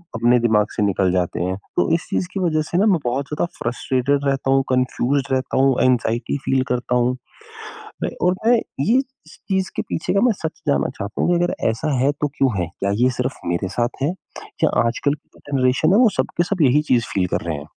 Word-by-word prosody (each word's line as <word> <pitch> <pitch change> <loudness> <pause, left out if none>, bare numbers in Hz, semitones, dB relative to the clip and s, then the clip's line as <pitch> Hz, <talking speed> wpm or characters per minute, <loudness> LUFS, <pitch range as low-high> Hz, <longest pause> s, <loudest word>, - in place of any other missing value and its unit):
अपने 120 +2 +3
दिमाग 110 -3 +2
से 105 - 0
निकल 95 -2 +1
जाते 90 -2 -1
हैं। 95 +1 -1 0.2
तो - - +2
इस 165 - -3
चीज़ 180 - -1
की 195 - -2
वजह 165 -4 +1
से 155 +3 -3
ना 200 - +4
मैं 195 -6 +3
बहुत 130 +3 -1
ज़्यादा 150 - 0
फ्रस्ट्रेटेड 130 +4 0
रहता 135 -1 0
हूँ, 135 0 +3
कन्फ्यूज़्ड 130 +2 0
रहता 130 0 -1
हूँ, 135 -1 +4
एंग्ज़ायटी 120 0 +1
फील 130 -1 +2
करता 125 0 0
हूँ। 125 +1 +1 0.9
मैं - - 0 0.2
और 180 - +2
मैं 240 +2 +6
ये 225 - 0 0.3
इस - - -15
चीज़ 190 -1 0
के - - 0
पीछे - - -3
का 200 - +2
मैं 245 - +4
सच 160 0 -4
जानना 145 - +2
चाहता 100 +1 -4
हूँ - - +2
कि 175 - +1
अगर 175 - 0 0.2
ऐसा 115 +7 -2
है 140 +2 +3
तो 150 - +2
क्यों 135 -2 +3
है? 85 - -1
क्या 100 - 0
ये 130 - +5
सिर्फ 125 +1 -3
मेरे 85 +2 -1
साथ 120 +6 -2
है 145 - +2 0.5
या - - +5 0.2
आजकल 120 +4 0
की 150 - -12
जो - - -18
जनरेशन 130 +4 +2
है - - +5
वो 245 -3 +6
सब - - +1
के 175 - +4
सब 185 0 -2
यही 145 +1 +4
चीज़ 120 -2 +3
फील 95 -2 +1
कर - - -1
रहे 85 -3 -2
हैं? 70 - -8
130 Hz, 235 wpm, -21 LUFS, 120-155 Hz, 0.9 s, मैं